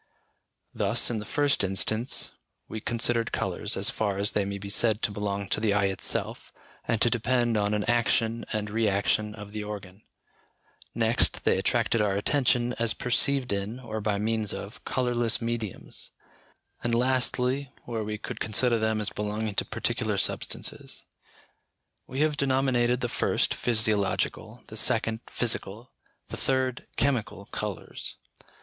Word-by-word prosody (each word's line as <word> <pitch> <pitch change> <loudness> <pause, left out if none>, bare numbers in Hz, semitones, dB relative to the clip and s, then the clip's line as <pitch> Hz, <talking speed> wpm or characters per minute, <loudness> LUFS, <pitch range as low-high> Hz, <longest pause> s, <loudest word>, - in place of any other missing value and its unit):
Thus, 105 +4 +2
in 115 - -1
the 105 - -7
first 145 -6 +2
instance, 110 +6 0 0.4
we 110 - -5
considered 115 0 +2
colours, - - -1
as - - +2
far 100 -3 -1
as 100 +1 +1
they 100 - 0
may 100 0 -3
be 100 0 -7
said 110 +1 +3
to 105 - +1
belong 100 -1 -3
to - - +1
the 105 -2 +2
eye 100 -1 +3
itself, - - -1 0.4
and 115 - +1
to 120 - +5
depend 120 0 +1
on 105 0 +1
an 105 - 0
action 115 -1 +2
and 105 -1 -2
re 110 0 +1
action 105 +2 +1
of 105 -1 -9
the 105 0 -4
organ; 100 -2 -8 0.9
next, 115 0 +2
they - - +3
attracted 115 - +1
our 100 -2 +1
attention 125 +2 +2
as 115 -1 +2
perceived 125 -1 +2
in, 100 +5 -3
or 110 -4 -5
by 105 -1 0
means 110 0 0
of, - - -8
colourless 120 -3 +1
mediums; 115 -4 -5 0.7
and 120 0 +1
lastly, 125 +2 +1
where 115 -2 -3
we 105 0 -4
could - - -7
consider 115 +2 +2
them 110 0 +1
as 105 - -1
belonging 105 +1 -3
to - - 0
particular - - -1
substances. - - -2 1.0
We 135 +2 -3
have 155 -1 +2
denominated 130 -3 +2
the 120 - +1
first, - - +1
physiological, 110 -5 0
the - - -7
second, 110 0 +2
physical, 115 0 -2 0.4
the - - -6
third, 130 -1 -1
chemical 120 -7 0
colours. - - -4
110 Hz, 150 wpm, -27 LUFS, 105-120 Hz, 1.0 s, to